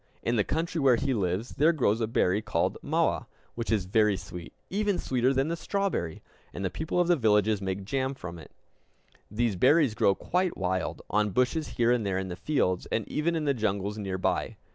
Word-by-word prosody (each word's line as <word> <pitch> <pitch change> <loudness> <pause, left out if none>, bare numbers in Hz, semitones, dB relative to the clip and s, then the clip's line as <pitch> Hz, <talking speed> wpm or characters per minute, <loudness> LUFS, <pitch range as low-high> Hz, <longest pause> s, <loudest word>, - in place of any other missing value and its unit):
In 120 - +1
the 105 - +3
country 165 - -2
where 130 -3 +5
he 135 +3 0
lives 100 +1 -1
there 155 +4 +5
grows 120 -8 +1
a 110 - +1
berry 105 -3 +1
called 105 -6 0
mawa, - - 0 0.3
which 115 -1 -3
is 105 -5 +1
very 105 +1 +3
sweet 90 -2 -9 0.2
even 205 -1 +1
sweeter 130 -3 +1
than 135 +1 +1
the 170 - -1
strawberry; 190 - -2 0.3
and 95 - -3
the 90 - -1
people 160 +3 -2
of 175 - +3
the 175 - +5
villages 105 - +2
make 95 0 -3
jam 130 +4 -1
from 90 -10 -8
it. - - -13 0.8
These 110 0 0
berries 135 - +4
grow 100 -2 +3
quite 180 - -1
wild, 95 0 -2
on 105 +1 +2
bushes 125 - 0
here 120 -1 +3
and 120 -2 +2
there 95 -2 -1
in 95 0 -3
the 90 - -4
fields, 95 -9 0
and 110 - -2
even 165 +3 0
in 160 -2 -1
the 140 - +3
jungles 105 -3 -2
near 95 -2 -3
by. 95 - -1
115 Hz, 210 wpm, -28 LUFS, 95-145 Hz, 0.8 s, where